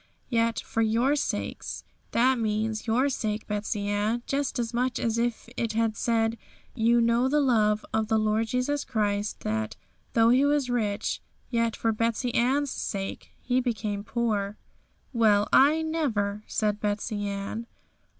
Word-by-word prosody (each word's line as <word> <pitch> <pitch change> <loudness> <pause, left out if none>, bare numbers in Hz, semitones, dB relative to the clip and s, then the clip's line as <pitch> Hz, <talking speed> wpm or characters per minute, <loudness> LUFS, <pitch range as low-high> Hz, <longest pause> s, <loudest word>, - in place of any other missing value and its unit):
"Yet 230 -1 +1
for 225 - -2
your 230 +6 +2
sakes, 290 - -3
" - - -39
that 255 +1 +4
means 215 0 -1
your 245 +5 +3
sake, 215 -5 -2
Betsey 210 -1 -2
Ann, 210 +4 0
just 275 -1 -1
as 235 -1 -2
much 250 +1 0
as 230 0 0
if 235 -1 -1
it 230 -2 -1
had 225 -1 +1
said, 225 0 0 0.3
"You 235 0 +3
know 235 +2 +3
the 300 +2 +3
love 215 -6 +2
of 220 0 +1
the 220 0 +2
Lord 215 +1 +1
Jesus 255 +4 0
Christ, 210 -2 -1
that, 110 0 -2 0.4
though 230 0 +5
He 255 +3 +5
was 285 -3 +2
rich, 210 -4 -1 0.3
yet 230 -1 +1
for 225 - 0
Betsey 230 +2 -1
Ann's 270 +3 +2
sake 195 -1 -4
He 255 0 +1
became 215 -4 -2
poor."' 215 -3 -1 0.6
'Well, 210 -3 +4
I 300 +4 +6
never!' 225 -11 -1
said 210 -1 0
Betsey 205 0 -2
Ann. 200 +3 -4
225 Hz, 155 wpm, -27 LUFS, 210-245 Hz, 0.6 s, I